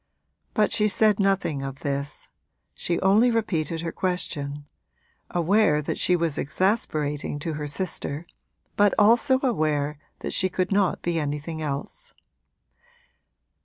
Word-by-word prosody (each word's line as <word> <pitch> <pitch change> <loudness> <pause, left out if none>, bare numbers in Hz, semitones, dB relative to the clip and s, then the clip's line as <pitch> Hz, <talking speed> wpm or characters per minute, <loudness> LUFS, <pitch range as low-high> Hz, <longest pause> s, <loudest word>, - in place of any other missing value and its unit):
But 215 - +3
she 210 - +2
said 210 0 +3
nothing 195 -7 +1
of 135 0 -6
this 140 0 -3 0.5
she 170 - -2
only 210 +6 +5
repeated 165 - -1
her 165 -1 -3
question: 145 -6 -2 0.6
aware 175 -2 +3
that 150 - -3
she 180 - +3
was 165 -4 -1
exasperating 150 -4 -1
to 155 +2 -4
her 150 -1 -4
sister 150 0 -3 0.5
but 205 -1 +4
also 240 +5 +4
aware 150 - 0 0.2
that - - -4
she 185 - +2
could 185 +1 -1
not 195 -2 +1
be 170 -1 0
anything 150 +2 -4
else. 155 - -5
170 Hz, 130 wpm, -25 LUFS, 150-200 Hz, 0.6 s, only